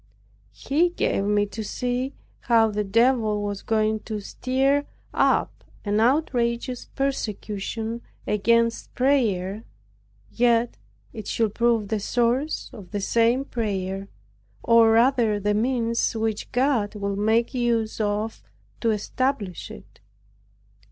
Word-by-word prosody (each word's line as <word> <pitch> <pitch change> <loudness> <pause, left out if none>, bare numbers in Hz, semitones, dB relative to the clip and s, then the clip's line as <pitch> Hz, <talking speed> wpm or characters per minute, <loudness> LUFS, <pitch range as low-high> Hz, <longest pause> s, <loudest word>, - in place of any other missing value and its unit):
He 325 +6 +1
gave 200 - -1
me 205 0 +2
to 215 +2 -6
see 250 +5 -2 0.3
how 225 -2 +3
the 210 0 -1
Devil 220 0 +2
was 205 -1 -3
going 220 -1 +1
to 215 0 -5
stir 270 +7 0 0.3
up - - +1 0.2
an 205 +1 +1
outrageous 245 -2 0
persecution 225 -3 -3 0.2
against 230 +3 +1
prayer, 220 -7 +1 0.7
yet 235 -1 +2 0.4
it 215 - -7
should 220 -3 0
prove 230 -3 +1
the 220 - 0
source 245 +7 0
of 200 -6 -11
the 205 - -3
same 235 +6 +2
prayer, 195 -5 -3 0.6
or 230 -1 +6
rather 230 -2 +3
the 205 +1 0
means 230 +1 0
which 220 -1 -2
God 245 -5 +1
would 200 -1 -3
make 225 +4 +2
use 235 -3 0
of 210 - -2 0.4
to 230 - +1
establish 215 -2 -2
it. - - -13
225 Hz, 120 wpm, -24 LUFS, 210-245 Hz, 0.7 s, or